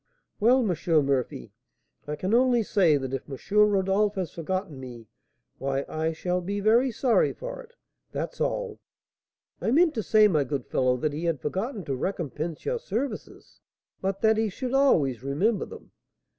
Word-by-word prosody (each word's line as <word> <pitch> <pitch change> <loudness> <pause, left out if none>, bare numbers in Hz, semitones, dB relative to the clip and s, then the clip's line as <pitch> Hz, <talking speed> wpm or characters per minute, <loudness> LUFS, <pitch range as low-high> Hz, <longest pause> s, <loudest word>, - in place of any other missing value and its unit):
'Well, 240 +2 +4
M. 165 -4 +2
Murphy, 130 - -2 0.5
I 150 - -2
can 185 +7 -2
only 245 -1 +4
say 175 -7 +3
that 135 -1 -5
if 135 - -4
M. 135 - -5 0.3
Rodolph 200 +1 +1
has 185 -5 -3
forgotten 170 -2 -4
me, 120 -3 -9 0.5
why 135 0 -1
I 160 +1 -1
shall 180 +3 -2
be 200 +3 -3
very 230 +6 +4
sorry 240 +1 +2
for - - -7
it, 475 -1 -17 0.4
that's - - -5
all.' - - -2 0.8
'I - - 0
meant 320 +5 +4
to 225 - -1
say, 215 0 +5
my 155 -7 +2
good 135 -2 -3
fellow, 125 -1 +1
that 150 +3 -1
he 160 +4 -4
had 165 -4 0
forgotten 195 - -3
to 135 - -2
recompense 160 0 -4
your 480 0 -1
services, 255 - -5 0.4
but 195 0 -2
that 220 -1 +4
he 220 -1 +1
should 250 +6 -5
always 155 - +3
remember 180 - 0
them.' - - -12
185 Hz, 170 wpm, -26 LUFS, 145-225 Hz, 0.8 s, say